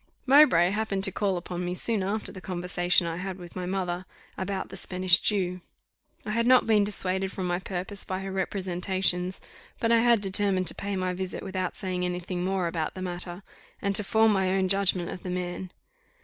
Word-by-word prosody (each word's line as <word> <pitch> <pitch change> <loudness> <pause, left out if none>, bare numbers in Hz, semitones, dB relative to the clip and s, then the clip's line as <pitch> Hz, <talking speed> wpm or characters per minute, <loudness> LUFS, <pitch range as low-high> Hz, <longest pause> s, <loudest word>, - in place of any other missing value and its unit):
Mowbray 260 - +6
happened 205 -2 -2
to 195 - +5
call 195 -2 0
upon 175 0 -5
me 180 0 -3
soon 220 +2 +1
after 205 +3 -3
the 185 - -10
conversation 180 -1 +1
I 165 0 -3
had 190 0 -5
with 175 -2 -12
my 180 -1 -4
mother 185 -1 -3 0.3
about 190 0 -4
the - - -9
Spanish 185 -1 +3
Jew. 180 -3 0 0.6
I 210 - -3
had 230 +2 +1
not 255 0 +6
been 215 -2 +4
dissuaded 190 -2 +1
from 190 -2 -4
my 175 0 -1
purpose 190 +1 -2
by 185 0 -4
her 195 0 -5
representations; 185 -1 -1 0.4
but 230 - +1
I 230 - +6
had 235 -1 +4
determined 195 -1 +1
to - - -3
pay 200 0 -4
my 185 -1 -1
visit 185 0 -4
without 185 -2 -3
saying 185 -2 -2
any 180 0 -2
thing 180 0 -4
more 190 -1 0
about 165 -2 -3
the 185 - -5
matter, 175 +1 -5 0.4
and 200 0 -1
to 210 - +5
form 220 +2 +3
my 190 -1 +1
own 190 0 +1
judgment 190 -3 +4
of 180 - -7
the 185 - -6
man. 180 0 -4
185 Hz, 205 wpm, -27 LUFS, 180-200 Hz, 0.6 s, Mowbray